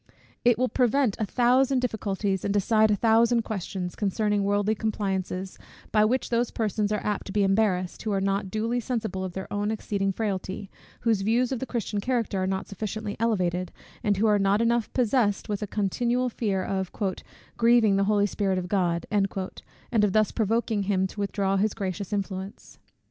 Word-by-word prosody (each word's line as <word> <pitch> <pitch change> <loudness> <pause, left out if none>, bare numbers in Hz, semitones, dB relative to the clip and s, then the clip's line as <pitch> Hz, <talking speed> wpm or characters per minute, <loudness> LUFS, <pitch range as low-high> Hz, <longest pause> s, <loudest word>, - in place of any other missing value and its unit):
It 240 -2 +4
will 255 +1 +2
prevent 250 -2 +2
a 215 - -1
thousand 255 +4 +3
difficulties, 205 -5 -1
and 200 - 0
decide 215 +2 +3
a 210 - +3
thousand 230 +2 +3
questions, 190 -3 -4
concerning 210 0 0
worldly 205 +1 +1
compliances; 195 -3 -3 0.3
by 215 0 +4
which 250 +4 0
those 235 0 +1
persons 215 -1 -1
are 210 - -1
apt 210 -1 -2
to - - -5
be 205 0 +2
embarrassed, 195 -2 +1
who 220 - -2
are 195 - +1
not 195 0 -1
duly 225 +4 -1
sensible 220 -6 -3
of 185 -2 -5
their 190 +1 -5
own 205 0 0
exceeding 200 -2 -1
frailty, 195 -1 -3 0.3
whose 225 -4 +2
views 235 +5 +1
of 260 - -1
the 265 - -4
Christian 215 -3 -2
character 230 -4 -1
are 185 - 0
not 190 0 -2
sufficiently 215 +1 -4
elevated, 185 -6 0 0.3
and 205 -3 +2
who 215 - +2
are 210 -1 +4
not 195 +1 +3
enough 230 0 +1
possessed 235 -5 +1
with 205 -1 -3
a 210 - -2
continual 240 +5 0
fear 200 -5 -1
of 190 -1 -2 0.7
"grieving 230 -3 +5
the 195 0 +2
Holy 205 0 +3
Spirit 195 -2 0
of 180 -1 -3
God," 175 -3 0
and 200 +2 -2
of 200 -2 +2
thus 215 -1 +3
provoking 225 -1 0
him 190 -1 +1
to 190 - -7
withdraw 195 -1 0
his 210 +2 +1
gracious 190 -1 -4
influence. 195 -1 -5
205 Hz, 180 wpm, -26 LUFS, 195-225 Hz, 0.7 s, grieving